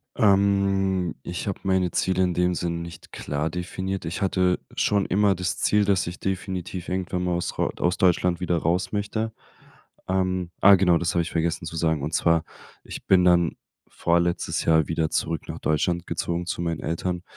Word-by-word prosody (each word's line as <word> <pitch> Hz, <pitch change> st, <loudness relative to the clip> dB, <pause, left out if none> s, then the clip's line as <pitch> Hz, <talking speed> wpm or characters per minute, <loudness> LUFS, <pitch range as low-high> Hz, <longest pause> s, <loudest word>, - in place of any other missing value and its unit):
Ähm, 95 Hz, -4 st, +2 dB
ich 90 Hz, +2 st, -5 dB
habe 100 Hz, -, -3 dB
meine 95 Hz, -2 st, +1 dB
Ziele 95 Hz, 0 st, +1 dB
in 90 Hz, -1 st, +1 dB
dem 90 Hz, 0 st, +1 dB
Sinne 85 Hz, -1 st, -2 dB
nicht 85 Hz, 0 st, -9 dB
klar 75 Hz, +2 st, -3 dB
definiert. 95 Hz, +2 st, -4 dB
Ich 85 Hz, +4 st, -4 dB
hatte 90 Hz, -1 st, +2 dB, 0.2 s
schon 100 Hz, -1 st, +1 dB
immer 100 Hz, 0 st, +2 dB
das 90 Hz, +1 st, -2 dB
Ziel, 105 Hz, -1 st, +2 dB
dass 95 Hz, -3 st, +1 dB
ich 90 Hz, -, -6 dB
definitiv 95 Hz, -2 st, -4 dB
irgendwann 90 Hz, -1 st, -2 dB
mal 90 Hz, -1 st, 0 dB
aus 85 Hz, -, -3 dB
ro -, -, +1 dB
aus 90 Hz, +1 st, 0 dB
Deutschland 90 Hz, -1 st, +2 dB
wieder 90 Hz, -2 st, 0 dB
raus 85 Hz, +3 st, 0 dB
möchte. 110 Hz, +2 st, -2 dB, 0.8 s
Ähm, 95 Hz, -2 st, 0 dB
ah, 100 Hz, 0 st, +9 dB
genau, 90 Hz, -2 st, +4 dB
das 85 Hz, -1 st, -1 dB
habe 85 Hz, -, +3 dB
ich -, -, -7 dB
vergessen 85 Hz, 0 st, -1 dB
zu 80 Hz, -, -7 dB
sagen, 80 Hz, -3 st, +1 dB
und 80 Hz, +2 st, -3 dB
zwar, 85 Hz, 0 st, +2 dB, 0.4 s
ich -, -, -9 dB
bin 90 Hz, -2 st, +5 dB
dann 85 Hz, -2 st, +3 dB, 0.3 s
vorletztes 85 Hz, 0 st, 0 dB
Jahr 80 Hz, -2 st, +4 dB
wieder 80 Hz, -1 st, 0 dB
zurück 80 Hz, -2 st, -2 dB
nach -, -, -5 dB
Deutschland 85 Hz, +3 st, 0 dB
gezogen 85 Hz, +1 st, -2 dB
zu 85 Hz, -, -3 dB
meinen 85 Hz, -2 st, -2 dB
Eltern, 90 Hz, +2 st, -3 dB
90 Hz, 185 wpm, -24 LUFS, 85-95 Hz, 0.8 s, ah